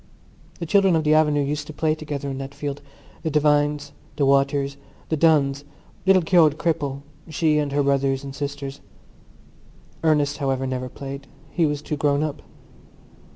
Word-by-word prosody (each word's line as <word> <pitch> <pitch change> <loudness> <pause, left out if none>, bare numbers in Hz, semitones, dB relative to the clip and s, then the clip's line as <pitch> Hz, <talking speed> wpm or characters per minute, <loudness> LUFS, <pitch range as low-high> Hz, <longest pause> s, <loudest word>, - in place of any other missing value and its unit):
The 170 - -4
children 195 +1 +4
of 160 - +1
the 155 0 +3
avenue 150 -2 +3
used 145 +1 -3
to 155 - -8
play 155 +1 +1
together 150 -2 -5
in 135 -1 -4
that 135 +1 -7
field—the 145 +2 -7
Devines, 145 -1 +2 0.2
the 140 - +1
Waters, 140 0 +2 0.3
the 160 - +1
Dunns, 145 -3 +3 0.4
little 190 -2 +5
Keogh 165 -2 +5
the 150 - -9
cripple, 145 -4 -2 0.3
she 155 0 +2
and 145 -1 -1
her 145 +1 +1
brothers 135 -1 +1
and 135 -1 -7
sisters. 140 -1 -5 1.2
Ernest, 145 -3 +2
however, 135 -1 -1
never 130 -1 -3
played: 140 +1 -8 0.2
he 170 -3 +2
was 145 0 -3
too 150 - -3
grown 145 +1 +1
up. 155 -2 -4
145 Hz, 160 wpm, -23 LUFS, 140-155 Hz, 1.2 s, little